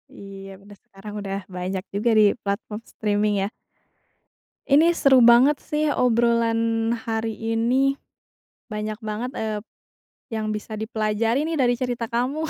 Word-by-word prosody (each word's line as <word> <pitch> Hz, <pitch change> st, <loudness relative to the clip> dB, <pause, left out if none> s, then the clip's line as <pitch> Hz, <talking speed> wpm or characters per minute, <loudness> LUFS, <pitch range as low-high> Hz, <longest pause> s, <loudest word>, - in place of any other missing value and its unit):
Iya 195 Hz, 0 st, -10 dB
bener, 205 Hz, 0 st, -15 dB
sekarang 200 Hz, +2 st, -11 dB
udah 195 Hz, -1 st, -4 dB, 0.2 s
banyak 185 Hz, +1 st, -3 dB
juga 215 Hz, +4 st, +1 dB
di -, -, +7 dB, 0.2 s
platform 210 Hz, +1 st, -4 dB
streaming 210 Hz, -1 st, 0 dB
ya? -, -, 0 dB, 1.2 s
Ini 310 Hz, +5 st, +5 dB
seru 275 Hz, -7 st, +5 dB
banget 245 Hz, +5 st, +5 dB
sih 305 Hz, 0 st, -1 dB
obrolan 230 Hz, -1 st, +2 dB, 0.2 s
hari 225 Hz, 0 st, -1 dB, 0.2 s
ini. 260 Hz, +4 st, +2 dB, 0.7 s
Banyak 215 Hz, 0 st, -4 dB
banget, 220 Hz, +3 st, -4 dB
eee, 215 Hz, -3 st, -3 dB, 0.7 s
yang 215 Hz, -1 st, -2 dB
bisa 215 Hz, +1 st, -5 dB
dipelajari 220 Hz, +4 st, -1 dB
nih 330 Hz, -, -2 dB
dari 245 Hz, -5 st, +2 dB
cerita 240 Hz, -2 st, -3 dB
kamu. 265 Hz, +6 st, -1 dB
225 Hz, 130 wpm, -23 LUFS, 210-250 Hz, 1.2 s, di